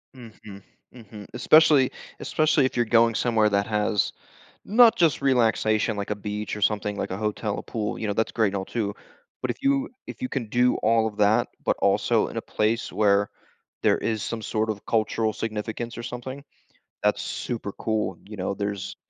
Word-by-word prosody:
Mhm. 110 -5 -12 0.3
Mhm, 110 -4 -11
especially 145 +1 +5 0.3
especially 155 -3 +2
if 130 - -2
you're 120 -1 +2
going 115 0 +4
somewhere 110 -3 +2
that 100 0 +1
has, 105 -1 +1 0.5
not 230 +2 +6
just 165 -4 +3
relaxation, 115 -4 +2
like 100 0 -4
a - - +1
beach 105 +1 -4
or 105 - -8
something, 105 -1 0
like - - -3
a 95 - -3
hotel, 105 0 -2
a - - -5
pool, 110 -2 -4
you 110 - -3
know? 105 - 0
That's 110 +2 0
great 110 -2 +2
and 100 - -3
all 95 - -3
too, 105 -1 -3 0.5
but - - -2
if - - -3
you 275 0 +2 0.2
if - - -9
you 255 - -1
can 130 - -3
do 125 +3 +3
all 110 0 +2
of 105 - -11
that, 105 +1 +3 0.2
but - - +1
also - - +2
in - - -9
a - - -2
place 110 +2 -1
where 100 -1 +2 0.5
there - - +3
is 110 -2 -2
some 115 -1 -4
sort 110 +1 -1
of 105 -2 -6
cultural 110 0 0
significance 110 +2 -4
or 120 - -6
something, 130 +3 -7 0.6
that's - - +2
super 110 -4 -4
cool, 110 -5 -2
you 105 +1 -10
know? 90 - -2
There's 100 -1 -4
110 Hz, 190 wpm, -25 LUFS, 105-120 Hz, 0.6 s, not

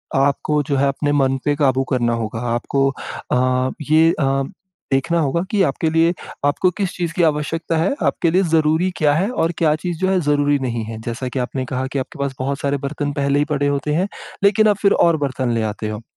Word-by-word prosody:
आपको 140 +2 +1
जो 140 0 -1
है, 140 +1 +3
अपने 145 +1 -1
मन 135 -2 +2
पे 145 -1 +2
क़ाबू 135 -3 +2
करना 120 -3 +1
होगा। 115 -1 -3
आपको 135 +3 +1 0.4
अ, 130 +1 +2 0.2
ये 160 +1 +6
अ, 135 -1 +1 0.5
देखना 150 +6 +1
होगा 160 +2 +1
कि 205 -2 +2
आपके 160 0 0
लिए 165 +2 +3 0.3
आपको 145 +6 +2
किस 195 -3 0
चीज़ 170 -2 -3
की 175 0 +1
आवश्यकता 160 +2 0
है, 165 +8 +1
आपके 170 - +1
लिए 185 +3 +3
ज़रूरी 160 +3 +3
क्या 150 -2 +3
है? 185 +8 +1
और 165 -9 0
क्या 155 -2 +3
चीज़ 175 -3 -2
जो 190 - +1
है 190 -1 +2
ज़रूरी 145 -1 +2
नहीं 120 -3 -2
है, 110 0 -7
जैसा 120 +3 -4
कि 130 - -3
आपने 130 +1 -3
कहा 130 +1 -3
कि 140 - -1
आपके 130 - -7
पास 140 -1 -2
बहुत 135 +2 -2
सारे 140 0 0
बर्तन 145 +1 -3
पहले 140 0 +1
ही 145 - +2
पड़े 145 -2 0
होते 145 +1 -1
हैं, 180 +5 +1 0.4
लेकिन 210 +2 +4
आप 205 -2 +3
फिर 200 - +4
और 170 -1 +3
बर्तन 130 -2 -2
ले 115 - 0
आते 105 +1 -5
हो, 105 0 -5
145 Hz, 225 wpm, -20 LUFS, 130-165 Hz, 0.5 s, ये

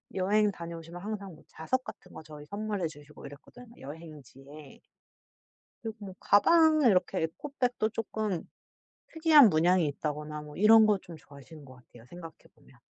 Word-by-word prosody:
여행 205 +3 +2
다녀오시면 170 -1 -9
항상 200 -2 -6
뭐 - - -20
자석 255 +12 -3
같은 - - -12
거 - - -10
저희 150 -1 -12
선물해 205 0 -4
주시고 150 -1 -14
이랬거든요 230 - -14
여행지의. 145 -1 -13 1.0
그리고 225 -1 -6
뭐 190 -1 -10
가방에 310 +6 +4
이렇게 185 -6 +1
에코백도 245 - -2
조금 215 -4 -4 0.7
특이한 315 -6 +6
문양이 175 +1 +2
있다거나 150 +1 -5
뭐 150 0 -12
이런 220 +2 +6
거 210 -1 +3
좀 175 -2 -12
좋아하시는 145 +1 -15
것 130 -1 -14
같아요 120 -2 -19
생각해 165 +3 -11 0.2
보면. - - -23
175 Hz, 360 characters per minute, -29 LUFS, 150-215 Hz, 1.0 s, 특이한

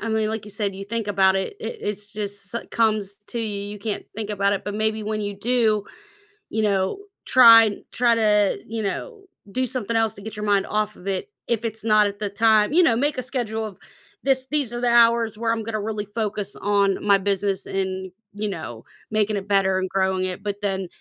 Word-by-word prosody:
I 225 - -4
mean, 220 -1 +1
like 220 -1 -4
you 210 - -10
said, 200 -1 -2
you 195 +1 -7
think 225 +1 -3
about 190 -1 +3
it, 190 - -3
it 465 - -5
it's 205 0 -4
just 205 -1 -6
s 235 - -1
comes 215 -3 +1
to 235 - -4
you, 210 -3 -3
you 210 - -8
can't 210 0 -4
think 215 -1 -4
about 200 0 +1
it, 195 - -5
but, 205 - -4
maybe 220 0 0
when 215 0 -2
you 205 -1 -3
do, 220 -3 +1 0.7
you 220 0 -1
know, 195 - +1 0.3
try 230 -4 +8 0.2
try 235 -1 +3
to, 210 -3 +3
you 225 0 -3
know, 405 - -4 0.3
do 255 +4 0
something 235 -3 -1
else 225 -2 +2
to - - -11
get 220 +1 -8
your 210 0 -4
mind 200 -1 +2
off 215 0 -1
of 180 - -12
it, 195 - -2 0.2
if 235 -1 0
it's 225 -1 -3
not 215 -2 +4
at 200 0 -6
the 210 - -2
time 215 +3 +3
you 360 - +6
know, 235 -9 +4
make 285 +3 0
a 255 - -2
schedule 225 -4 -2
of, 205 -3 -8 0.5
"This 265 -1 +2
these 280 -6 0
are 240 - -4
the 245 - +2
hours 230 -2 +1
where 230 0 0
I'm 225 -1 -3
gonna 215 -1 -3
really 210 -1 -3
focus 210 -2 -2
on 200 -1 +1
my 200 -1 +5
business 195 0 -1
and, 190 -1 -3 0.2
you 210 +1 -3
know, 155 - -7 0.3
making 215 0 +1
it 195 0 -6
better 195 -2 +2
and 185 - -1
growing 190 -1 0
it." 185 +1 -5
But 205 0 -4
then, 195 -2 -2
210 Hz, 225 wpm, -23 LUFS, 200-225 Hz, 0.7 s, try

